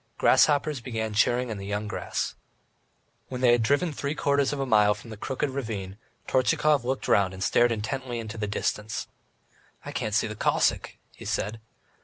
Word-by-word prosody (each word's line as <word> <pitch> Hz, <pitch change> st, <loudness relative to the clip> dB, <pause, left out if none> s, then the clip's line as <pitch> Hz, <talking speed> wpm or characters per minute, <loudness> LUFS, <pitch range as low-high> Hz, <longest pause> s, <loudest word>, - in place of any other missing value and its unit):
Grasshoppers 145 Hz, -2 st, +3 dB
began 110 Hz, -3 st, -3 dB
churring 120 Hz, +3 st, +2 dB
in 105 Hz, -, -5 dB
the 100 Hz, -, -7 dB
young 105 Hz, +1 st, -2 dB
grass. -, -, -3 dB, 0.9 s
When 125 Hz, -1 st, -5 dB
they 125 Hz, -2 st, +6 dB
had 120 Hz, -1 st, +4 dB
driven 145 Hz, +8 st, +1 dB
three 140 Hz, +1 st, -3 dB
quarters 140 Hz, -2 st, +2 dB
of 145 Hz, -, -3 dB
a 135 Hz, -, 0 dB
mile 105 Hz, -4 st, +4 dB
from 110 Hz, +3 st, -12 dB
the -, -, -6 dB
Crooked 135 Hz, +6 st, -2 dB
Ravine, 105 Hz, -7 st, -5 dB, 0.3 s
Tortchakov 135 Hz, +2 st, +2 dB
looked 130 Hz, +2 st, -2 dB
round 95 Hz, -2 st, +3 dB
and 95 Hz, -, -4 dB
stared 120 Hz, +6 st, +3 dB
intently 120 Hz, +3 st, -3 dB
into 110 Hz, -1 st, -6 dB
the 105 Hz, -, -1 dB
distance. 105 Hz, +1 st, -2 dB, 0.8 s
"I -, -, -5 dB
can't 105 Hz, -1 st, -2 dB
see -, -, +3 dB
the 105 Hz, -, -5 dB
Cossack," -, -, +1 dB, 0.2 s
he -, -, -11 dB
said. 110 Hz, +2 st, -2 dB
115 Hz, 180 wpm, -27 LUFS, 105-135 Hz, 0.9 s, they